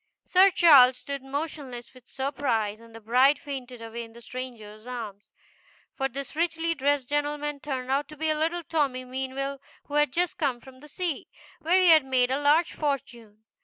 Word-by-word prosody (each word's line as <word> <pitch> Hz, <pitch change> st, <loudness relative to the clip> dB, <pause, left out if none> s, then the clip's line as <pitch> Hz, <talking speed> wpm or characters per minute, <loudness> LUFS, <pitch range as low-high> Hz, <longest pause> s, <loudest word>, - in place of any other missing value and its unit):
Sir 375 Hz, +2 st, +6 dB
Charles 275 Hz, -8 st, +7 dB
stood 280 Hz, +1 st, -6 dB
motionless 270 Hz, -3 st, -6 dB
with 255 Hz, -1 st, -18 dB
surprise, 250 Hz, -6 st, -2 dB
and 230 Hz, 0 st, -16 dB
the -, -, -9 dB
bride 255 Hz, +6 st, +4 dB
fainted 260 Hz, -5 st, -8 dB
away 230 Hz, +1 st, -6 dB
in 225 Hz, 0 st, -13 dB
the 235 Hz, -, -13 dB
stranger's 230 Hz, -4 st, -8 dB
arms. 220 Hz, -5 st, -7 dB, 0.7 s
For 270 Hz, -, -1 dB
this 275 Hz, +1 st, -7 dB
richly 330 Hz, 0 st, 0 dB
dressed 285 Hz, -3 st, 0 dB
gentleman 295 Hz, 0 st, -2 dB
turned 265 Hz, -3 st, -4 dB
out 280 Hz, +1 st, 0 dB
to 305 Hz, +1 st, -12 dB
be 315 Hz, +1 st, +1 dB
little 330 Hz, +3 st, -1 dB
Tommy 275 Hz, -6 st, -1 dB
Meanwell, 265 Hz, +2 st, -4 dB, 0.2 s
who 290 Hz, -, -13 dB
had 295 Hz, -2 st, +3 dB
just 350 Hz, +4 st, -1 dB
come 270 Hz, -6 st, 0 dB
from 260 Hz, +1 st, -16 dB
sea, 335 Hz, 0 st, -4 dB, 0.3 s
where 340 Hz, +3 st, +3 dB
he 365 Hz, -1 st, +5 dB
had 315 Hz, -3 st, +7 dB
made 255 Hz, -1 st, +1 dB
a 275 Hz, +2 st, 0 dB
large 300 Hz, +4 st, +3 dB
fortune. 235 Hz, -7 st, -4 dB
270 Hz, 175 wpm, -26 LUFS, 250-295 Hz, 0.7 s, Charles